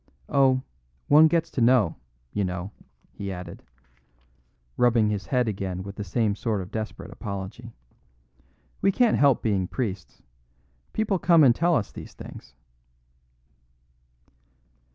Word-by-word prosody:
Oh, 130 Hz, -2 st, +3 dB, 0.5 s
one 155 Hz, +2 st, +8 dB
gets 165 Hz, 0 st, 0 dB
to 130 Hz, -, -2 dB
know, 115 Hz, -7 st, +4 dB, 0.4 s
you 105 Hz, -, 0 dB
know," 90 Hz, +1 st, -4 dB, 0.4 s
he 100 Hz, -1 st, -6 dB
added, 90 Hz, -2 st, -8 dB, 1.1 s
rubbing 115 Hz, -3 st, +3 dB
his 100 Hz, -4 st, -4 dB
head 125 Hz, +2 st, +1 dB
again 95 Hz, -3 st, -3 dB
with 100 Hz, 0 st, -8 dB
the 105 Hz, -, -5 dB
same 105 Hz, +2 st, 0 dB
sort 110 Hz, -1 st, -2 dB
of 95 Hz, +1 st, -7 dB
desperate 110 Hz, -1 st, -5 dB
apology. 100 Hz, +4 st, -7 dB, 1.1 s
"We 195 Hz, -, +4 dB
can't 235 Hz, +2 st, +2 dB
help 140 Hz, -3 st, +4 dB
being 100 Hz, -5 st, 0 dB
priests. 100 Hz, -, -5 dB, 0.7 s
People 210 Hz, -4 st, 0 dB
come 170 Hz, -3 st, +5 dB
and 125 Hz, -4 st, +7 dB
tell 170 Hz, +5 st, +2 dB
us 110 Hz, -8 st, -1 dB
these -, -, -10 dB
things." 65 Hz, -, -11 dB
110 Hz, 130 wpm, -25 LUFS, 95-135 Hz, 1.1 s, one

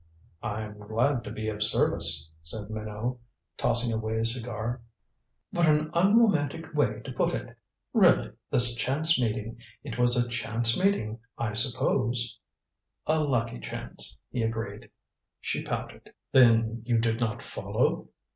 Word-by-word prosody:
"I'm 105 Hz, 0 st, -5 dB
glad 115 Hz, +5 st, -1 dB
to -, -, -7 dB
be 110 Hz, 0 st, -5 dB
of 105 Hz, -1 st, -6 dB
service," 80 Hz, -7 st, +3 dB
said 105 Hz, +6 st, -5 dB
Minot, 110 Hz, +3 st, -5 dB, 0.4 s
tossing 120 Hz, 0 st, +1 dB
away 110 Hz, 0 st, -3 dB
his 115 Hz, +1 st, +3 dB
cigar. 120 Hz, 0 st, -5 dB, 0.7 s
"What 170 Hz, -1 st, +1 dB
an 155 Hz, 0 st, +2 dB
unromantic 170 Hz, -, +2 dB
way 150 Hz, -, 0 dB
to -, -, -6 dB
put -, -, -1 dB
it! -, -, -8 dB, 0.4 s
Really, -, -, +4 dB, 0.2 s
this 120 Hz, -1 st, +9 dB
chance 135 Hz, +5 st, +2 dB
meeting 110 Hz, 0 st, -3 dB, 0.2 s
it 120 Hz, -4 st, -7 dB
was 120 Hz, 0 st, +4 dB
a 120 Hz, 0 st, +1 dB
chance 115 Hz, -1 st, +2 dB
meeting, 185 Hz, -, 0 dB, 0.2 s
I 115 Hz, -2 st, -3 dB
suppose? 120 Hz, 0 st, +1 dB, 0.3 s
" -, -, -58 dB
"A 155 Hz, 0 st, +1 dB
lucky 125 Hz, -, -1 dB
chance," -, -, -5 dB
he 120 Hz, -, -2 dB
agreed. 115 Hz, -2 st, -4 dB, 0.5 s
She -, -, -3 dB
pouted. -, -, -6 dB, 0.2 s
"Then 115 Hz, -2 st, +4 dB
you 120 Hz, -1 st, 0 dB
did 115 Hz, 0 st, 0 dB
not 115 Hz, -3 st, -2 dB
follow? -, -, -2 dB
115 Hz, 140 wpm, -27 LUFS, 110-130 Hz, 0.7 s, this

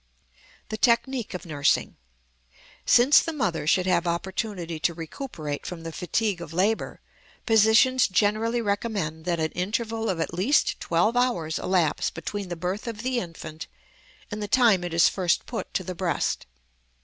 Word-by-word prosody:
THE 220 Hz, -, -3 dB
TECHNIQUE 235 Hz, -2 st, +1 dB
OF 180 Hz, -, -7 dB
NURSING. 145 Hz, -3 st, +1 dB, 0.9 s
Since 250 Hz, +5 st, +7 dB
the 330 Hz, -, -2 dB
mother 180 Hz, -, -2 dB
should 180 Hz, +3 st, +3 dB
have 175 Hz, -1 st, +1 dB
opportunity 175 Hz, -1 st, -3 dB
to 170 Hz, 0 st, 0 dB
recuperate 160 Hz, -, -6 dB
from 170 Hz, -2 st, -7 dB
the 165 Hz, -, -5 dB
fatigue 185 Hz, +2 st, -1 dB
of 165 Hz, -2 st, -8 dB
labor, 200 Hz, +6 st, 0 dB, 0.4 s
physicians 225 Hz, +4 st, +5 dB
generally 215 Hz, +4 st, +1 dB
recommend 200 Hz, -7 st, -2 dB
that 175 Hz, -2 st, 0 dB
an 160 Hz, 0 st, -1 dB
interval 225 Hz, +4 st, -2 dB
of 180 Hz, -3 st, -1 dB
at 165 Hz, -, -2 dB
least 215 Hz, -, +2 dB
twelve 175 Hz, +8 st, +1 dB
hours 235 Hz, -11 st, 0 dB
elapse 180 Hz, -5 st, +1 dB
between 195 Hz, +4 st, -5 dB
the 175 Hz, -, -3 dB
birth 185 Hz, +7 st, -4 dB
of 225 Hz, -1 st, -5 dB
the 255 Hz, -1 st, 0 dB
infant 165 Hz, -4 st, -8 dB, 0.6 s
and 210 Hz, +1 st, -4 dB
the 205 Hz, -, -3 dB
time 220 Hz, -5 st, +4 dB
it 175 Hz, -, -4 dB
is 170 Hz, -, +6 dB
first 180 Hz, -3 st, 0 dB
put 235 Hz, -, -5 dB
to 185 Hz, -, 0 dB
the 185 Hz, -, -5 dB
breast. 170 Hz, -, -1 dB
190 Hz, 160 wpm, -25 LUFS, 170-225 Hz, 0.9 s, Since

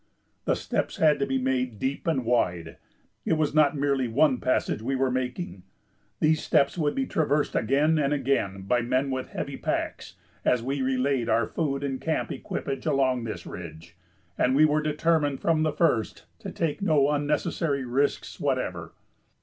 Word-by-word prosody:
The -, -, +2 dB
steps -, -, -2 dB
had 155 Hz, -2 st, +4 dB
to 140 Hz, -, 0 dB
be 135 Hz, 0 st, 0 dB
made 130 Hz, -3 st, -1 dB
deep 135 Hz, -, -3 dB
and 135 Hz, -7 st, 0 dB
wide; 90 Hz, -9 st, 0 dB, 0.5 s
it -, -, +1 dB
was 155 Hz, -2 st, +1 dB
not 150 Hz, -1 st, +4 dB
merely 140 Hz, -2 st, +1 dB
one 130 Hz, +2 st, +3 dB
passage 130 Hz, -4 st, 0 dB
we 135 Hz, +4 st, -1 dB
were 130 Hz, 0 st, +1 dB
making; 125 Hz, -, -3 dB, 0.6 s
these 155 Hz, 0 st, +3 dB
steps 140 Hz, -3 st, +2 dB
would 150 Hz, -4 st, 0 dB
be 270 Hz, -, 0 dB
traversed 150 Hz, -, 0 dB
again 145 Hz, +7 st, +2 dB
and 140 Hz, -1 st, +1 dB
again 130 Hz, -9 st, 0 dB
by 120 Hz, +5 st, +1 dB
men 130 Hz, +3 st, 0 dB
with 130 Hz, 0 st, -3 dB
heavy -, -, -5 dB
packs -, -, -3 dB, 0.3 s
as 125 Hz, -2 st, +2 dB
we 135 Hz, +2 st, -2 dB
relayed 130 Hz, -1 st, 0 dB
our 115 Hz, 0 st, +3 dB
food 140 Hz, -1 st, -2 dB
and 135 Hz, -2 st, -3 dB
camp 160 Hz, -1 st, -1 dB
equipage 135 Hz, +1 st, -4 dB
along 130 Hz, -4 st, +1 dB
this 110 Hz, -, -6 dB
ridge, 85 Hz, +2 st, -9 dB, 0.4 s
and 130 Hz, -, +3 dB
we 155 Hz, +2 st, +6 dB
were 155 Hz, 0 st, +2 dB
determined 150 Hz, -2 st, +1 dB
from 160 Hz, -2 st, +1 dB
the 155 Hz, 0 st, +2 dB
first 145 Hz, -8 st, 0 dB
to -, -, -7 dB
take 165 Hz, +3 st, -2 dB
no 150 Hz, -7 st, +3 dB
unnecessary 145 Hz, -1 st, -1 dB
risks 135 Hz, +4 st, -1 dB
whatever. -, -, -2 dB
140 Hz, 170 wpm, -26 LUFS, 125-150 Hz, 0.6 s, we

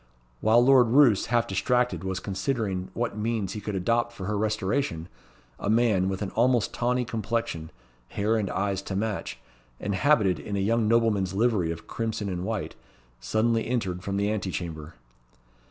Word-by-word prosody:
While 115 Hz, -, +4 dB
Lord 130 Hz, -2 st, +6 dB
Roos, 120 Hz, -4 st, +5 dB
half 120 Hz, -1 st, +2 dB
distracted, 125 Hz, +5 st, 0 dB
was 95 Hz, 0 st, -2 dB
considering 95 Hz, -2 st, -2 dB
what 115 Hz, -3 st, -2 dB
means 105 Hz, -3 st, -2 dB
he 105 Hz, -, -5 dB
could 105 Hz, 0 st, -4 dB
adopt 120 Hz, +5 st, 0 dB
for 95 Hz, -5 st, -7 dB
her 105 Hz, +2 st, -1 dB
restoration, 105 Hz, -, -1 dB, 0.5 s
a -, -, -2 dB
man, 110 Hz, -5 st, +3 dB
with 95 Hz, +1 st, -3 dB
an 100 Hz, -, -4 dB
almost 120 Hz, 0 st, +2 dB
tawny 125 Hz, +1 st, 0 dB
complexion, 110 Hz, -8 st, -3 dB, 0.4 s
hair 105 Hz, -, 0 dB
and 105 Hz, -4 st, -1 dB
eyes 100 Hz, 0 st, -1 dB
to 100 Hz, -, -5 dB
match, 105 Hz, 0 st, -3 dB, 0.4 s
and 100 Hz, -, -2 dB
habited 100 Hz, -, +3 dB
in 100 Hz, -, -5 dB
the 100 Hz, -, 0 dB
young 115 Hz, +1 st, +2 dB
nobleman's 105 Hz, -5 st, +2 dB
livery 105 Hz, -6 st, +2 dB
of 85 Hz, 0 st, -7 dB
crimson 110 Hz, -3 st, -3 dB
and 90 Hz, -1 st, -3 dB
white, 110 Hz, -2 st, -3 dB, 0.5 s
suddenly 110 Hz, -, 0 dB
entered 95 Hz, -8 st, -2 dB
from 100 Hz, -1 st, -2 dB
the 100 Hz, +1 st, +1 dB
ante 105 Hz, -3 st, -2 dB
chamber. 80 Hz, -5 st, -6 dB
105 Hz, 170 wpm, -26 LUFS, 95-115 Hz, 0.5 s, Lord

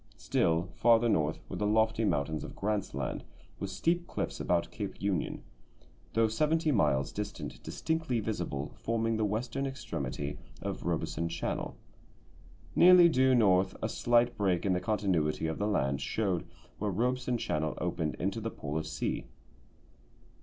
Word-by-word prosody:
Still 85 Hz, +1 st, +1 dB
farther 115 Hz, 0 st, +4 dB
north 80 Hz, -7 st, +1 dB
were -, -, -5 dB
the 105 Hz, -, 0 dB
lofty 110 Hz, +1 st, +2 dB
mountains 80 Hz, -4 st, 0 dB
of -, -, -8 dB
Grant's 105 Hz, 0 st, -2 dB
Land -, -, -3 dB, 0.4 s
with -, -, -3 dB
steep 175 Hz, +1 st, 0 dB
cliffs -, -, -3 dB
about 85 Hz, -1 st, 0 dB
Cape 100 Hz, +1 st, -5 dB
Union, 100 Hz, -5 st, -1 dB, 0.7 s
though 115 Hz, 0 st, +4 dB
seventy 155 Hz, +7 st, +1 dB
miles 70 Hz, -, +2 dB
distant 105 Hz, 0 st, -5 dB
distinctly 160 Hz, -6 st, -1 dB
visible, 100 Hz, -10 st, -3 dB
forming 115 Hz, 0 st, 0 dB
the 110 Hz, -, +1 dB
western 125 Hz, +6 st, -2 dB
extremity 70 Hz, -, -4 dB, 0.2 s
of -, -, -5 dB
Robeson 85 Hz, 0 st, -1 dB
Channel. 85 Hz, 0 st, -3 dB, 1.0 s
Nearly 180 Hz, -1 st, +8 dB
due 130 Hz, -3 st, +4 dB
north 95 Hz, -5 st, +3 dB
a -, -, -1 dB
slight 120 Hz, 0 st, +2 dB
break 95 Hz, -3 st, +1 dB
in 95 Hz, -, +3 dB
the 90 Hz, -, +1 dB
continuity 90 Hz, -9 st, 0 dB
of 80 Hz, 0 st, -2 dB
the 105 Hz, -, +1 dB
land 70 Hz, -9 st, 0 dB
showed 90 Hz, -5 st, -1 dB, 0.3 s
where 105 Hz, -, 0 dB
Robeson 125 Hz, +5 st, 0 dB
Channel 80 Hz, -7 st, -1 dB
opened 80 Hz, -1 st, -1 dB
into 100 Hz, +4 st, -2 dB
the 115 Hz, -, -2 dB
Polar 75 Hz, -5 st, -3 dB
Sea. -, -, -3 dB
105 Hz, 145 wpm, -31 LUFS, 85-120 Hz, 1.0 s, Nearly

